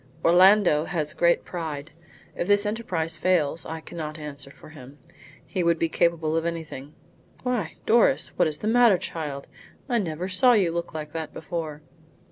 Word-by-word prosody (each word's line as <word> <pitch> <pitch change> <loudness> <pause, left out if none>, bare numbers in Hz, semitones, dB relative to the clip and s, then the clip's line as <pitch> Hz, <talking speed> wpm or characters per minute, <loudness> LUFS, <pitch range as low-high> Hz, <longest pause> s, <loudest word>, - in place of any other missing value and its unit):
"Orlando 180 -2 +5
has 155 -4 -2
great 170 0 +2
pride. 160 -3 -5 0.4
If 175 - -3
this 205 0 +3
enterprise 180 -7 -2
fails 165 -2 +1
I 160 0 -6
cannot 155 -2 -7
answer 145 -2 -9
for 140 - -15
him. 140 -2 -13 0.5
He 185 - -2
would 170 0 +3
be 165 0 0
capable 165 -2 +1
of 165 - +1
anything. 160 -4 -6 0.5
Why, 245 -8 -2
Doris! 220 - +3
what - - +3
is 150 -1 -2
the 210 - -4
matter, 230 -3 +5
child? 150 -5 -6 0.4
I 240 -3 +1
never 175 -2 -3
saw 245 +7 +4
you 195 -7 +3
look 170 -1 -4
like 150 -1 -6
that 160 -2 -5
before." 160 -3 -5
165 Hz, 165 wpm, -25 LUFS, 155-185 Hz, 0.5 s, Orlando